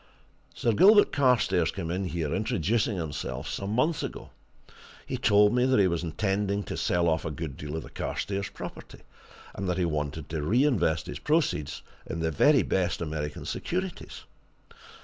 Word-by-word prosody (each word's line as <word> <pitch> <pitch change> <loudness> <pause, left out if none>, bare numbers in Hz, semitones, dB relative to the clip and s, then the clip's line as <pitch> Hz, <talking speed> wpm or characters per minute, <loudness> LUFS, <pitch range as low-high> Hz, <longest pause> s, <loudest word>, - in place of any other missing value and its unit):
Sir 115 - +1
Gilbert 205 - +6
Carstairs 105 - +3
came 85 -4 -4
in 95 +2 -2
here, 80 -4 -2
introducing 110 +1 0
himself, 75 -4 -4
some 100 - -4
months 150 +7 +1
ago. - - -6 0.7
He - - -3
told 105 +1 +4
me 125 0 +3
that 130 -4 +3
he 100 - +5
was 85 -2 -1
intending 100 +4 -1
to - - -5
sell 85 -1 +1
off 80 -1 +1
a - - -3
good 75 -2 -5
deal 75 +2 -6
of 80 - -4
the - - -12
Carstairs 100 -1 -3
property, - - -9 0.5
and 95 -1 -3
that 90 - 0
he 90 - +1
wanted 75 -2 -3
to 80 -1 -3
reinvest 110 - +2
his - - -6
proceeds 150 - 0 0.2
in 85 - -4
the 80 0 0
very 140 - +4
best 95 -2 0
American 75 -2 -4
securities. 185 0 -4
95 Hz, 170 wpm, -27 LUFS, 80-115 Hz, 0.7 s, Gilbert